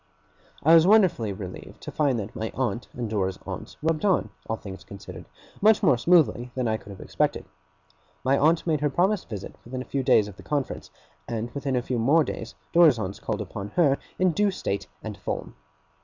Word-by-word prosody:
I 160 +3 +6
was 165 +1 +7
wonderfully 180 - +4
relieved 95 -2 -8
to - - -7
find 140 -5 +1
that 105 -1 -5
my 110 0 -3
aunt 120 -3 -2
and 120 -2 -3
Dora's 95 -3 -1
aunts - - -7
rubbed 160 +1 0
on, 195 -3 +2 0.2
all 110 - +1
things 95 -4 -9
considered, 100 0 -10 0.4
much 215 +1 +5
more - - +6
smoothly 130 -3 +3
than 130 -2 0
I 110 0 +1
could 105 - -15
have 95 -2 -9
expected. - - -1 0.8
My 130 +2 +3
aunt 160 +4 +3
made 155 -4 +1
her 150 - +2
promised 185 +5 +1
visit 100 -4 -6
within 130 +1 -5
a - - -17
few 140 - -2
days 110 -5 +4
of 100 -2 -11
the - - -11
conference; 145 -3 -3 0.4
and 115 +1 -3
within 140 -1 -2
a 125 - 0
few 125 -1 -2
more 145 +8 +4
days, - - -6 0.2
Dora's 165 -7 +7
aunts 100 -3 -4
called - - -3
upon 100 0 -6
her, 145 -6 +4 0.2
in 185 -1 +3
due 205 +5 +2
state 100 - -3 0.2
and 110 -2 -5
form. - - -4
130 Hz, 200 wpm, -26 LUFS, 110-160 Hz, 0.8 s, was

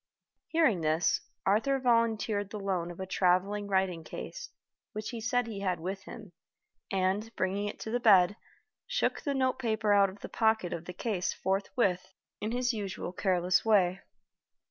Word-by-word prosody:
Hearing 290 - +2
this, 155 +1 +2 0.2
Arthur 230 +8 +2
volunteered 225 -4 +1
the 210 - -6
loan 185 -4 -1
of 175 - -9
a 190 - -3
traveling 190 +3 +1
writing 190 -4 0
case, - - -7 0.4
which 215 +2 -4
he 235 -2 -5
said 245 +1 +1
he 220 -3 -6
had 185 -2 -1
with 190 +3 -5
him, 220 -6 -10 0.6
and, 195 +3 0
bringing 195 +2 -1
it 205 - -6
to 220 - -5
the 245 - +1
bed, 205 -4 +6 0.5
shook - - 0
the 285 -2 -1
note 260 -1 +1
paper 220 -4 +1
out 200 -1 +5
of 195 +2 -13
the - - -6
pocket 220 -5 +1
of 170 - -6
the 180 - -7
case 190 -2 -2
forthwith 190 -1 -1 0.3
in 215 +2 -3
his 245 0 0
usual 195 -4 -4
careless 185 0 +2
way. 195 -4 +3
200 Hz, 165 wpm, -30 LUFS, 185-225 Hz, 0.6 s, bed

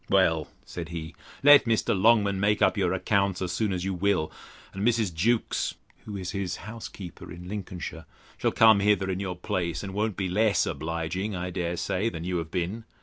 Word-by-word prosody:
Well, 80 -5 +3 0.2
said 85 -2 -6
he, 80 -1 -6 0.3
let 145 -1 +8
Mr. 115 -2 +1
Longman 100 -1 +4
make 105 +1 +2
up - - +4
your 95 -4 +1
accounts, 95 0 +1
as 90 -2 -2
soon 105 +2 0
as 90 -1 -2
you 95 - -1
will; 90 -3 +1 0.4
and 95 - -4
Mrs. 110 -5 +2
Jewkes 110 +8 0 0.3
(who 105 -2 -5
is 90 -2 -4
his 95 -3 -2
housekeeper 105 -5 -8
in 85 +1 -9
Lincolnshire) 90 -5 -6 0.3
shall - - 0
come 110 -2 +6
hither 100 -1 +2
in 95 - -2
your 95 -2 -3
place, 90 -2 -2
and 95 -1 -6
won't 105 0 -1
be 95 - -1
less 105 +3 +2
obliging, 85 +5 -3
I 90 0 -3
dare 85 0 -2
say, 100 +5 0
than 80 -7 -6
you 90 0 -1
have 80 -2 -4
been. 90 +6 -3
95 Hz, 195 wpm, -27 LUFS, 90-105 Hz, 0.4 s, let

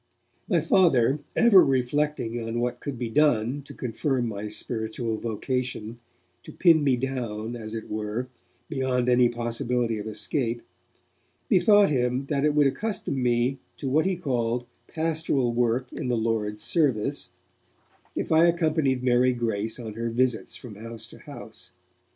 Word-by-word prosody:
My 175 -6 +3
Father, 150 -6 +3 0.2
ever 225 -6 +7
reflecting 130 -2 0
on 115 +1 -3
what 125 0 -2
could 140 -3 -5
be 115 -2 -4
done 135 -2 +2
to 140 +1 -12
confirm 125 +1 -1
my 105 -1 -4
spiritual 110 +1 -3
vocation, 115 0 -3 0.5
to - - -11
pin 165 -4 +4
me 135 -3 +3
down, 120 -3 -3
as 110 -1 -6
it 110 - -6
were, 110 +3 -3 0.4
beyond 130 -3 0
any 125 -1 +5
possibility 120 -1 -1
of 105 - -6
escape, 115 +2 -2 0.9
bethought 205 +2 +5
him 125 0 0
that 140 -2 0
it 150 -1 +2
would 150 -1 +5
accustom 180 -3 -1
me 125 +2 +1 0.2
to 140 - -4
what 155 +6 +2
he 190 - +1
called 120 -6 -1 0.2
'pastoral 160 -6 0
work 120 +1 0
in - - -4
the 120 -1 +1
Lord's 110 -2 -1
service', 140 -11 0 0.9
if - - -3
I 160 +2 +6
accompanied 155 -6 +1
Mary 125 0 +3
Grace 110 -1 -2
on 110 -3 -6
her 115 +2 -3
visits 120 0 0
from 110 -5 -10
house 115 +1 -8
to - - -14
house. - - -10
125 Hz, 150 wpm, -26 LUFS, 115-140 Hz, 0.9 s, ever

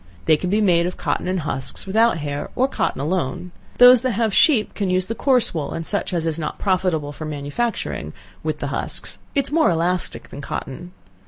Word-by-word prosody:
They 155 - +5
can 180 +4 -3
be 210 +3 +2
made 175 -4 +3
of 180 - -5
cotton - - -2
and 185 -1 0
husks, 135 -3 -4
without 220 +1 +3
hair, 145 -2 -4
or 260 - +3
cotton 275 - -2
alone. 170 +2 -2 0.3
Those 245 -1 +8
that 255 -1 0
have 220 0 0
sheep 245 -4 +4
can 200 -3 -2
use 185 0 +1
the 225 - -3
coarse 255 0 +2
wool, 155 -4 -3
(and 165 0 -4
such 200 +2 -1
as 170 -2 -1
is 165 0 -1
not 155 - -4
profitable 180 -6 0
for 155 +2 -7
manufacturing,) 150 +10 -3 0.3
with - - -2
the - - -4
husks, - - -3 0.2
it 280 - +2
is - - -5
more 320 0 +4
elastic 175 +1 -1
than 140 - -8
cotton. 155 +5 -6
180 Hz, 210 wpm, -21 LUFS, 155-220 Hz, 0.3 s, Those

